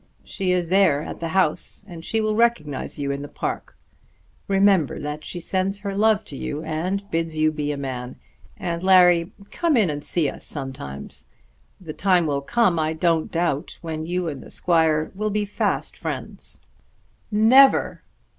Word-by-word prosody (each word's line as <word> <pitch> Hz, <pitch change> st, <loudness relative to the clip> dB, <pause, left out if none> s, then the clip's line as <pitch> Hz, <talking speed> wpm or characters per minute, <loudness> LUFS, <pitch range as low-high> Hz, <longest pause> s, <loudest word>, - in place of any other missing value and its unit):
She 190 Hz, -2 st, -2 dB
is 180 Hz, -2 st, 0 dB
there 180 Hz, -6 st, +4 dB
at -, -, -7 dB
the 165 Hz, -, -3 dB
house, 180 Hz, +2 st, 0 dB
and 170 Hz, -4 st, -9 dB
she 225 Hz, +5 st, 0 dB
will 215 Hz, 0 st, 0 dB
recognise 170 Hz, -, 0 dB
you 140 Hz, -1 st, -2 dB
in 140 Hz, 0 st, -3 dB
the 145 Hz, -, -6 dB
park. -, -, -5 dB, 0.7 s
Remember 195 Hz, -5 st, +3 dB
that 150 Hz, +1 st, -5 dB
she 175 Hz, -, -6 dB
sends 190 Hz, +3 st, -1 dB
her 200 Hz, -1 st, -5 dB
love 215 Hz, 0 st, +3 dB
to 140 Hz, -, -7 dB
you, 145 Hz, +3 st, -4 dB
and 185 Hz, +6 st, -2 dB
bids 165 Hz, -1 st, -1 dB
you 155 Hz, 0 st, +3 dB
be 150 Hz, -1 st, -2 dB
a 145 Hz, -, -3 dB
man. 130 Hz, -2 st, -5 dB, 0.4 s
And, 170 Hz, -1 st, -3 dB
Larry, 180 Hz, -2 st, +5 dB, 0.2 s
come 330 Hz, -6 st, +1 dB
in 200 Hz, -8 st, +3 dB
and 145 Hz, 0 st, -5 dB
see 165 Hz, -4 st, +1 dB
us -, -, -6 dB
sometimes. 130 Hz, -, -5 dB, 0.5 s
The 165 Hz, -4 st, -8 dB
time 180 Hz, -2 st, +2 dB
will 140 Hz, -2 st, 0 dB
come, 180 Hz, +2 st, +2 dB
I 155 Hz, 0 st, 0 dB
don't 165 Hz, 0 st, +1 dB
doubt, 165 Hz, -4 st, -1 dB
when 160 Hz, -1 st, -4 dB
you 180 Hz, 0 st, -1 dB
and 140 Hz, -5 st, -5 dB
the -, -, -12 dB
squire 160 Hz, -3 st, +1 dB
will 215 Hz, +2 st, -2 dB
be 210 Hz, 0 st, 0 dB
fast 205 Hz, -, -1 dB
friends." -, -, -5 dB, 0.7 s
"Never!" 240 Hz, +6 st, +5 dB
170 Hz, 175 wpm, -23 LUFS, 150-195 Hz, 0.7 s, Larry